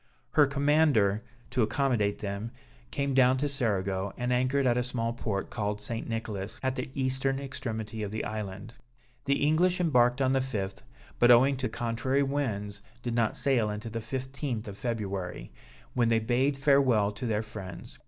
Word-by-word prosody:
Her 145 -2 +5
commander, 140 -7 +3 0.3
to 125 - +1
accommodate 110 -2 +1
them, 100 +2 -4 0.4
came 140 - -1
down 130 0 +5
to 145 +3 0
Cerigo, 100 -7 -1
and 125 0 0
anchored 130 +2 +2
at 120 -2 +3
a 125 - +2
small 120 -2 -2
port 105 -4 -3
called 105 -2 -2
St. 115 +2 -5
Nicholas, 110 0 -4
at 130 0 0
the - - -4
eastern 135 0 0
extremity 115 -5 -5
of 105 - -2
the 110 +2 -3
island. 105 +1 -5 0.5
The 140 +1 +2
English 175 +4 +3
embarked 125 -7 +3
on 130 -1 +2
the 135 - +3
5th, 105 -7 -3 0.4
but, 120 - +6
owing 130 +3 +7
to 130 -2 -2
contrary 120 +5 0
winds, 105 -8 -2 0.2
did 120 - -2
not 115 -2 +1
sail 125 -6 +2
until 105 +2 -5
the 115 - -3
15th 130 -1 -4
of 100 - -6
February, 100 -6 -3 0.4
when 120 -2 +2
they 115 - +4
bade 125 +5 +1
farewell 135 -7 +4
to 115 +4 -5
their 110 -1 0
friends. 105 -4 -9
120 Hz, 170 wpm, -29 LUFS, 105-135 Hz, 0.5 s, owing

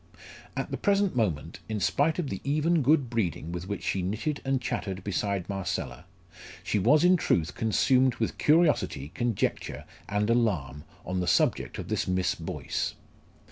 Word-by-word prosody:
At - - -3
the - - -2
present 200 -4 +2
moment, 85 -9 -1
in 110 -1 -2
spite 145 - +2
of 170 -6 -2
the 95 - -4
even 155 +3 +2
good 140 0 +3
breeding 90 -8 -2
with 90 +1 -5
which 100 0 -4
she 95 - 0
knitted 110 - -2
and 135 -1 +1
chattered 95 -6 -3
beside 100 -2 -1
Marcella, 95 -3 -4 0.6
she 105 - 0
was 150 - +4
in 180 +1 +6
truth 85 - +1
consumed 125 +3 +3
with 110 - -3
curiosity, 150 - +2
conjecture, 120 -3 -2 0.2
and 105 +1 +1
alarm 85 - 0 0.2
on 90 0 -2
the 90 - -1
subject - - +1
of - - -6
this - - -1
Miss 90 0 +1
Boyce. - - -3
110 Hz, 160 wpm, -28 LUFS, 90-140 Hz, 0.6 s, in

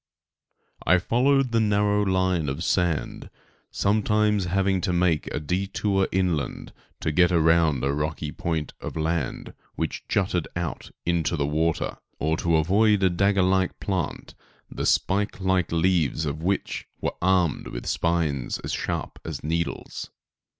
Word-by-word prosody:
* - - -24
I - - +6
followed 130 +6 +2
the 115 - +3
narrow 105 -1 +2
line 95 -5 +1
of 70 +5 -3
sand, 85 -3 -1 0.4
sometimes 105 -1 +2
having 95 +1 +1
to 90 - 0
make 85 -3 +1
a - - -2
detour 95 +4 0
inland 90 -6 -1 0.3
to 80 - 0
get 90 +3 +4
around 80 -5 +3
a 70 +1 +1
rocky 75 +1 -2
point 80 -2 -3
of - - -6
land 80 -3 -2 0.2
which - - -4
jutted 90 -4 0
out 85 -1 -4 0.2
into 85 -1 +1
the 70 - 0
water, 80 +2 0 0.2
or 80 +1 0
to 85 -1 +1
avoid 100 +5 +3
a 95 - +4
dagger 100 +2 +2
like 95 0 +1
plant 95 -4 -3 0.4
the - - -2
spike 100 +2 +1
like 95 -2 +1
leaves 80 -3 +1
of 75 +1 -3
which 95 +4 -2
were - - -2
armed 90 -3 +2
with - - -6
spines 80 -6 0
as - - -3
sharp - - -3
as 80 -3 -6
needles. 85 +2 -3
90 Hz, 145 wpm, -25 LUFS, 80-95 Hz, 0.4 s, I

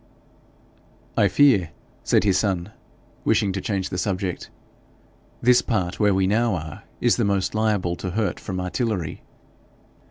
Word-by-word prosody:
'I - - +4
fear,' 120 - +4 0.3
said - - +3
his 100 -3 +2
son, 95 -2 -1 0.5
wishing 100 - +2
to 95 0 -3
change 95 -3 -2
the 90 - -3
subject, 95 -2 -3 0.9
'this 125 0 +5
part 95 -6 -2
where 105 -3 +3
we 95 0 +2
now 110 +2 +2
are 80 -2 -7 0.2
is 120 - +2
the 120 - +1
most 100 -2 0
liable 105 -5 0
to 90 - -4
hurt 105 +3 -1
from 95 -3 -5
artillery.' 90 -2 -2
100 Hz, 145 wpm, -23 LUFS, 90-110 Hz, 0.9 s, this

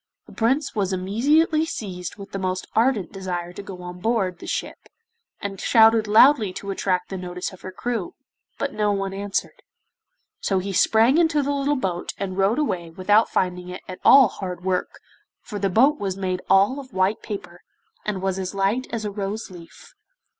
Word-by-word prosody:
The - - -15
Prince 265 +6 +1
was 195 -3 -1
immediately 280 - +2
seized 185 - -5
with 200 -1 -11
the 195 - -4
most 185 0 -2
ardent 225 -5 +2
desire 180 -2 -5
to 200 - -7
go 190 -3 -9
on 180 0 -8
board 195 -4 0
the - - -9
ship, - - -5 0.5
and 195 -1 -5
shouted 225 -1 +5
loudly 220 -1 +6
to 200 +1 -5
attract 185 -2 -1
the 195 - -4
notice 180 +1 -5
of 185 - -14
her 185 - -7
crew, 245 - -4 0.4
but 280 - -2
no 210 -1 +1
one 195 -1 -2
answered. 200 0 -3 0.8
So 195 - 0
he 195 +1 -2
sprang 225 - +4
into 320 -3 +3
the 285 - -1
little 285 +1 0
boat 185 -9 -3
and 190 -2 -4
rowed 195 +5 +2
away 180 - -1
without 205 +6 +3
finding 180 -1 -1
it 180 - -8
at 185 - -8
all 270 -3 +8
hard 180 -3 -6
work, 185 -1 -2 0.4
for 210 -3 -6
the 195 0 +1
boat 265 +10 +4
was 195 -2 -3
made 185 -1 -2
all 200 +8 +4
of 260 -2 -11
white 190 +3 +1
paper 180 -4 -7 0.4
and 195 -3 -3
was 190 0 -1
as 185 +1 -4
light 200 +6 0
as 225 -2 -3
a 205 - -2
rose 205 +1 -4
leaf. 170 -2 -14
195 Hz, 190 wpm, -23 LUFS, 185-230 Hz, 0.8 s, all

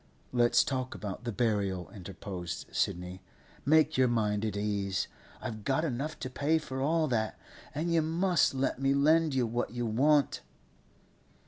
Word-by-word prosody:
'Let's 120 -1 +4
talk 130 -2 -3
about 105 +3 -6
the 120 - -1
burial,' 100 -5 -1
interposed 95 -2 -6
Sidney. 90 +1 -1 0.4
'Make 155 0 +4
your 130 - +5
mind 105 -3 +1
at 105 -2 -2
ease. 100 -2 -1 0.3
I've 110 -4 -6
got 140 +7 +1
enough 150 +2 -3
to 130 - -2
pay 150 +5 +2
for 130 -4 -4
all 160 +3 +2
that, 110 -3 0 0.4
and 165 +3 0
you 165 - +4
must 165 -1 +2
let 135 0 -1
me 135 0 +3
lend 155 +1 +4
you 130 -2 +2
what 120 +2 -2
you 120 -1 -2
want. 140 +6 +3
125 Hz, 155 wpm, -30 LUFS, 105-150 Hz, 0.4 s, your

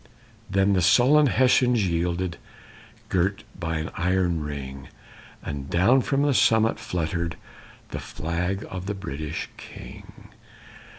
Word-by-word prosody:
Then 95 +1 +3
the 95 - +2
sullen 130 - +5
Hessians 125 -4 +3
yielded, 85 0 -1 0.7
Girt 95 +3 0 0.2
by 80 -2 -2
an 80 +1 -4
iron 90 -1 +1
ring, 70 -2 -6 0.6
And 70 -1 -5
down 110 +10 +4
from 140 +2 0
the 145 -1 +3
summit 110 -2 +3
fluttered 85 -1 -2 0.5
The - - -5
flag 90 +5 -3
of 95 0 -6
the 105 - -2
British 80 -4 -5
king. - - -12
90 Hz, 120 wpm, -25 LUFS, 80-105 Hz, 0.7 s, sullen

